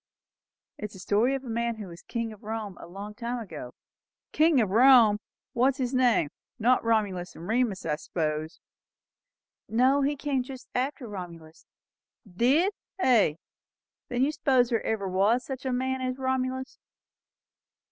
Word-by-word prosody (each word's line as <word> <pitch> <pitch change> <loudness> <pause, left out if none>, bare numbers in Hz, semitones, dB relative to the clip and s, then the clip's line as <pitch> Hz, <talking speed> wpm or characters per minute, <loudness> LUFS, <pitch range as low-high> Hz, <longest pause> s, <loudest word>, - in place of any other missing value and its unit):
"It - - -4
is 210 - -8
a - - -10
story 220 +8 +2
of 270 - -5
a - - -10
man 235 0 -1
who 215 -2 -7
was 170 +1 -11
king 230 -1 -4
of 210 - -16
Rome 215 -2 -5
a - - -10
great 200 +4 -9
while 240 +1 -2
ago." 155 - -8 0.6
"King 315 -2 +4
o' 225 - +4
Rome! 225 0 +6 0.3
What 245 +2 +3
was 270 -1 +1
his 255 -2 -2
name? 245 - +3 0.3
Not 245 +3 +3
Romulus 205 -6 0
and 170 - -9
Remus, 225 -5 0
I 150 -2 0
s'pose?" 155 -1 -3 1.1
"No; 255 +5 +3
but 275 - +2
he 295 - -2
came 280 -2 -1
just 255 0 -9
after 260 0 -2
Romulus." 170 -5 -9 0.6
"Did, 265 - +2 0.3
hey? 225 - +4 0.7
Then 245 +1 +1
you 285 - +2
s'pose 260 -5 +2
there 230 - +1
ever 210 -3 -1
was 205 +7 +2
sich 265 -1 -6
a 260 - 0
man 260 +1 -1
as 255 0 -2
Romulus?" 260 0 -2
235 Hz, 165 wpm, -27 LUFS, 200-260 Hz, 1.1 s, Rome